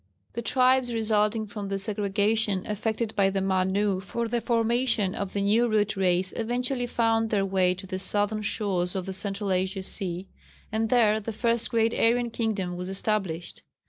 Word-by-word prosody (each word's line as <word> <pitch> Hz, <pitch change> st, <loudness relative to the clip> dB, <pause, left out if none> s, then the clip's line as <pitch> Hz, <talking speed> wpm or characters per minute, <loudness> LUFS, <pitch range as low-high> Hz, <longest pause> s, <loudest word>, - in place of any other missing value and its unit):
The 235 Hz, -, -3 dB
tribes 255 Hz, 0 st, +2 dB
resulting 215 Hz, 0 st, +1 dB
from 205 Hz, -1 st, -6 dB
the 195 Hz, 0 st, -2 dB
segregation 205 Hz, 0 st, 0 dB
effected 220 Hz, +1 st, -2 dB
by 195 Hz, -1 st, +3 dB
the 195 Hz, 0 st, -1 dB
Manu 190 Hz, +1 st, +1 dB
for 230 Hz, +4 st, -3 dB
the 235 Hz, +1 st, -1 dB
formation 230 Hz, -3 st, +1 dB
of 200 Hz, -2 st, -4 dB
the 200 Hz, -, 0 dB
new 220 Hz, +4 st, +3 dB
Root 210 Hz, -1 st, +1 dB
Race 185 Hz, -1 st, +1 dB
eventually 245 Hz, +2 st, -1 dB
found 225 Hz, -1 st, +1 dB
their 200 Hz, -3 st, +1 dB
way 185 Hz, -1 st, +2 dB
to 185 Hz, -, -9 dB
the 185 Hz, 0 st, -4 dB
southern 205 Hz, +2 st, 0 dB
shores 195 Hz, -4 st, -1 dB
of 185 Hz, -2 st, -2 dB
the 190 Hz, -, -4 dB
central 200 Hz, +1 st, -3 dB
Asian 190 Hz, +1 st, -1 dB
sea, 185 Hz, -1 st, -2 dB, 0.4 s
and 220 Hz, +1 st, 0 dB
there 220 Hz, -3 st, +4 dB
the 220 Hz, +1 st, -5 dB
first 230 Hz, +1 st, 0 dB
great 230 Hz, 0 st, +2 dB
Aryan 235 Hz, +1 st, +2 dB
kingdom 205 Hz, -6 st, -2 dB
was 180 Hz, +1 st, -5 dB
established. 190 Hz, -4 st, -2 dB
210 Hz, 175 wpm, -27 LUFS, 195-225 Hz, 0.4 s, there